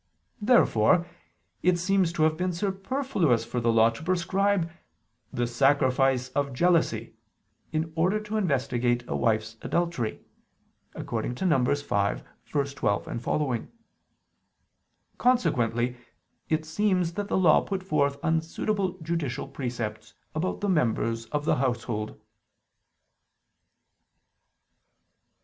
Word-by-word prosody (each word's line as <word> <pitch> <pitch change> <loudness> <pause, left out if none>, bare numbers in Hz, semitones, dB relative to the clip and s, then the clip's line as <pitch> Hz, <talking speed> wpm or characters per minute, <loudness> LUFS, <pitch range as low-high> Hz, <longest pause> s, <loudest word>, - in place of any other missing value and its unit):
Therefore 175 - +4 0.6
it 180 0 +3
seems 185 0 +2
to 155 - +1
have 155 0 +3
been 180 +2 -1
superfluous 195 - 0
for 120 - -3
the 115 0 +3
Law 115 0 +5
to 115 - -10
prescribe 185 +2 +1 0.6
the 120 - -1
"sacrifice 130 0 +2
of 140 +1 -1
jealousy" 140 -8 +1 0.6
in 160 0 -2
order 185 +6 +2
to 215 0 -6
investigate 130 - +1
a - - -2
wife's 110 0 0
adultery 170 -10 -1 0.8
(Num. - - -6
5:12, 125 - 0 0.3
seqq.). 130 -1 -1 1.5
Consequently 125 - +1 0.5
it 155 0 0
seems 180 0 +1
that 205 +3 -3
the - - 0
Law 175 -5 +5
put 195 -2 -4
forth 140 -6 +1
unsuitable 180 +4 -1
judicial 160 -6 -2
precepts 120 -5 -5 0.2
about 165 +7 -2
the 205 - 0
members 115 -7 +1
of 150 +3 -2
the - - +2
household. 120 -4 -2
150 Hz, 100 wpm, -27 LUFS, 120-180 Hz, 1.5 s, Law